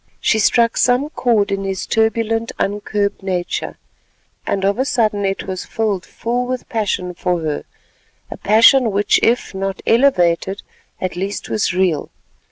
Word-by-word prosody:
She 220 - +2
struck 230 +2 +3
some 250 +5 +2
cord 220 -8 +1
in 195 0 -1
his 195 -1 -3
turbulent 225 0 0
uncurbed 205 0 -1
nature, 185 -2 -3 0.7
and 195 -1 0
of 200 +4 +1
a - - +3
sudden 220 -7 0
it 195 0 -2
was 185 -1 -5
filled 210 -5 -2
full 245 +2 -2
with 255 0 -4
passion 195 -5 -2
for 175 -1 -1
her—a 155 -2 -8
passion 230 +4 +5
which 205 0 +2
if, 235 -2 +1
not 195 0 -3
elevated, 195 -6 +2 0.4
at 185 -1 -3
least 195 +3 -4
was 215 - +1
real. 180 -5 0
205 Hz, 145 wpm, -18 LUFS, 190-230 Hz, 0.7 s, passion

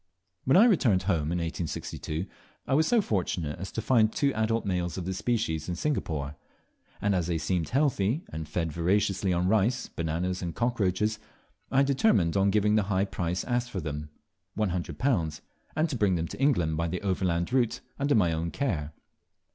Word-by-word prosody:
When 130 - +5
I 215 - +8
returned 130 - +3
home, 85 -5 0
in 90 - 0
1862, 85 0 -4 0.4
I - - -1
was 155 +3 +4
so 235 -2 +4
fortunate 90 - -2
as 95 - -6
to 115 - -3
find 110 -4 +4
two 140 +2 +1
adult 115 +1 0
males 90 -3 -1
of 90 - -4
this 95 0 -3
species 100 -11 -1
in 90 - -1
Singapore; 80 - -2 0.6
and 100 0 +1
as 90 -3 0
they 85 -2 0
seemed 85 -1 -1
healthy, 135 - +1
and 80 -1 -5
fed 80 0 -1
voraciously 95 +3 +1
on 90 +1 +1
rice, 110 +4 +1
bananas, 85 +3 -2
and 85 -3 -4
cockroaches, 105 -3 0 0.5
I 135 +1 +4
determined 135 - +2
on 100 0 +3
giving 105 +1 +3
the - - +4
very 100 - -5
high 95 0 +2
price 90 -2 -2
asked 120 -1 -1
for 100 - -4
them 75 -2 -5 0.5
£100. 90 - -1 0.3
and 155 +2 +2
to 140 - -2
bring 100 -5 +2
them 85 0 -1
to - - -7
England 90 - +2
by 85 +1 0
the 90 +4 -3
overland 90 0 0
route 125 -1 +1 0.2
under 140 +1 +2
my 90 -6 +3
own 80 +1 -2
care. 80 - -2
95 Hz, 185 wpm, -28 LUFS, 85-115 Hz, 0.6 s, I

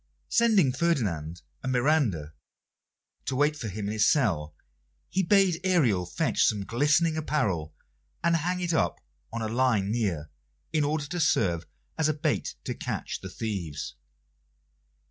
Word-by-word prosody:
Sending 215 - +4
Ferdinand 95 - -1 0.2
and 130 - -2
Miranda 125 - +1 0.9
to 135 - -2
wait 145 +3 +2
for 130 -7 -5
him 105 +1 -4
in 100 - -2
his 110 0 +4
cell, 80 - 0 0.6
he 190 - +2
bade 190 -2 +3
Ariel 125 - +2
fetch 90 - +1
some 105 -2 +1
glistening 150 - +2
apparel, 100 - -1 0.5
and 170 0 +3
hang 180 +3 -1
it 175 -1 0
up 160 - +1 0.3
on 115 0 -3
a - - -1
line 115 -4 +1
near, 90 -10 -1 0.4
in 155 -2 +2
order 150 0 0
to 175 +4 -4
serve 85 - +2 0.3
as 155 -1 +3
a 155 - 0
bait 150 - -1
to - - -3
catch - - -4
the - - -7
thieves. 90 -10 -4
130 Hz, 145 wpm, -28 LUFS, 95-160 Hz, 0.9 s, Sending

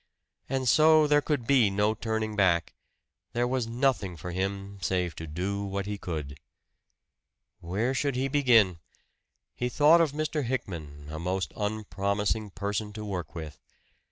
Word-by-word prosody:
And 135 -1 -1
so 155 +4 +6
there 145 0 +4
could 145 -5 -1
be 125 -5 +4
no 105 +2 +1
turning 110 -1 -2
back 90 -5 +2 0.6
there 120 +1 +1
was 125 -2 -1
nothing 115 -7 0
for 90 - -6
him 100 +2 -3
save 90 -2 -1
to 80 - -6
do 95 +6 -3
what 100 0 -3
he 105 0 -4
could. 75 -6 -5 1.2
Where 105 +9 -1
should 140 0 0
he 130 +2 0
begin? 120 - +4 0.7
He 125 - -2
thought 155 +6 +6
of 160 -4 +2
Mr. 155 0 -2
Hickman 80 - -5
a 80 - -5
most 90 +2 -2
unpromising 105 0 -1
person 105 +2 -3
to 110 0 -6
work 90 -7 -5
with. 75 -4 -7
105 Hz, 150 wpm, -28 LUFS, 95-125 Hz, 1.2 s, so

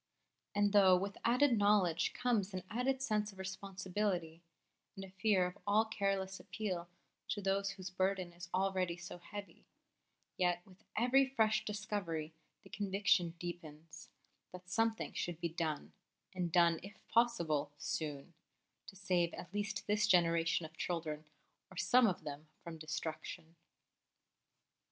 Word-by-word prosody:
And 205 0 +3
though 190 -3 +7
with 200 +2 -4
added 245 0 +4
knowledge 200 -5 +3
comes 210 -6 0
an 185 - -3
added 260 +3 0
sense 210 -4 0
of 195 - -18
responsibility, 190 -3 -3 0.5
and 195 -1 -6
a 190 - -14
fear 190 -1 +3
of 180 +2 -6
all 215 +2 +4
careless 195 -3 -1
appeal 180 -5 -4 0.4
to 210 - -1
those 195 0 +1
whose 185 -1 -7
burden 185 -1 0
is 175 0 -9
already 185 -2 0
so 175 0 -8
heavy, 205 +3 -9 0.7
yet 175 -1 +1
with 190 +3 -19
every 250 +4 +5
fresh 220 -5 +2
discovery 200 -7 -3 0.3
the - - -15
conviction 195 -4 +2
deepens 160 -3 -8 0.4
that 180 0 -11
something 225 +2 +1
should 175 -2 -3
be 170 - -1
done 160 -2 -3 0.4
and 180 -2 -2
done, 170 -2 +5
if 200 +3 -10
possible, 170 -12 +2
soon 145 +1 -4 0.5
to 195 - -10
save 180 -3 +1
at 180 - -9
least 205 0 -2
this 210 +1 +2
generation 170 -3 +3
of 160 0 -11
children, 155 -3 -3 0.4
or 185 - -14
some 250 +4 +5
of 180 -5 -1
them, 150 +1 -7 0.2
from 165 -1 -7
destruction. 160 +1 -5
185 Hz, 140 wpm, -36 LUFS, 170-205 Hz, 0.7 s, though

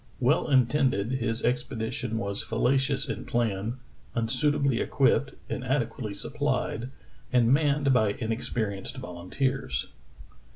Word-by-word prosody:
Well 135 +5 +2
intended, 130 -4 +2
his 115 -3 0
expedition 115 -2 -2
was 100 -2 +1
fallacious 135 +5 +1
in 115 0 -4
plan, 115 0 -1 0.4
unsuitably 130 +3 +1
equipped, 135 0 +2
inadequately 125 -4 -2
supplied, 115 +4 -1 0.4
and 125 -1 +4
manned 140 -2 +3
by 110 -5 +3
inexperienced 110 -3 -2
volunteers. 90 +11 -2
120 Hz, 95 wpm, -27 LUFS, 110-135 Hz, 0.4 s, and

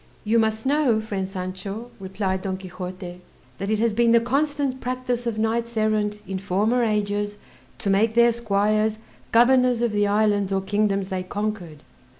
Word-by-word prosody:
"You 225 +2 +2
must 220 +1 0
know, 275 -5 +3
friend 200 -3 -3
Sancho," 195 +4 -6
replied 190 0 -2
Don 190 -1 -3
Quixote, 180 -1 -8 0.4
"that 195 +1 -3
it 215 - +2
has 225 0 +1
been 235 +1 +3
the 235 - +7
constant 275 +2 -1
practice 250 -1 -2
of 225 -2 -2
knights 230 +1 -1
errant 210 -1 0
in 190 0 -3
former 210 +6 +1
ages 205 -1 -1 0.4
to 200 - -3
make 220 +3 +2
their 235 0 +6
squires 215 -1 +1 0.3
governors 250 +1 +4
of 235 - +1
the 205 -1 +1
islands 205 -1 +2
or 195 0 +1
kingdoms 200 -1 0
they 190 -2 -2
conquered." 185 -5 -4
215 Hz, 160 wpm, -24 LUFS, 195-235 Hz, 0.4 s, the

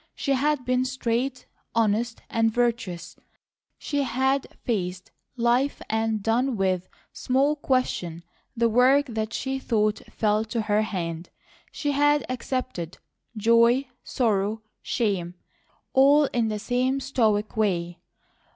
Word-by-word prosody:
She 275 - -2
had 280 0 +1
been 255 0 +2
straight, 255 0 -2 0.3
honest, 230 +1 +1
and 225 0 +1
virtuous. 225 -7 -2 0.6
She 285 -2 -2
had 265 +1 0 0.2
faced 185 -5 -2 0.3
life 245 +4 +2
and 220 -1 0
done 235 +3 +1
with 185 -2 0 0.2
small 275 +4 +1
question 220 - -1 0.3
the 235 0 +3
work 255 +5 +4
that 220 -3 -3
she 265 +2 -2
thought 215 -4 +1
fell 215 0 +1
to 225 +1 -2
her 210 0 +2
hand. 170 -5 -4 0.4
She 290 - -2
had 290 +1 +3
accepted 255 -8 -4 0.4
joy, 235 +4 +4 0.2
sorrow, 215 -2 0 0.2
shame, 185 -6 -1 0.6
all 285 +3 +6
in 235 -2 +1
the 215 -1 -2
same 255 +5 0
stoic 220 -6 0
way. 175 -5 0
230 Hz, 120 wpm, -25 LUFS, 210-260 Hz, 0.6 s, all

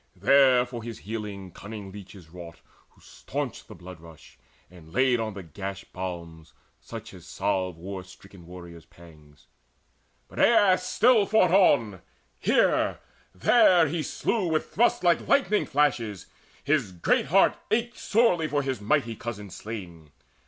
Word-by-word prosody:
There 130 -3 +4
for 125 -1 -8
his 115 0 -7
healing 105 -3 -7
cunning 100 +1 -9
leeches 95 -3 -12
wrought, 85 -2 -11 0.3
Who - - -27
stanched - - -6
the - - -12
blood 90 -1 -12
rush, 80 -2 -16 0.3
and 85 -2 -16
laid 130 +1 +2
on 110 -3 -4
the 100 - -7
gash 95 +4 -7
Balms, 85 -4 -8 0.3
such 115 -2 -10
as 90 -2 -14
salve 95 -4 -2
war 95 +2 -7
stricken 95 -1 -16
warriors' 85 -2 -12
pangs. 75 -4 -19 0.8
But - - -10
Aias 205 -5 +4
still 225 -3 +3
fought 195 -5 +3
on: 120 - +3 0.4
here, - - +2 0.4
there 180 - +5
he 160 +2 -2
slew 195 +5 -2
With 160 -1 -2
thrusts 235 -3 +2
like 175 -1 +2
lightning 215 -7 +2
flashes. 120 - 0 0.4
His 140 -8 0
great 85 +9 +1
heart 190 +7 +4
Ached 240 +2 -1
sorely 190 -8 +2
for 145 -1 -1
his 130 -5 -3
mighty 115 +1 0
cousin 105 -4 -7
slain. 90 -6 -9
105 Hz, 145 wpm, -26 LUFS, 90-150 Hz, 0.8 s, there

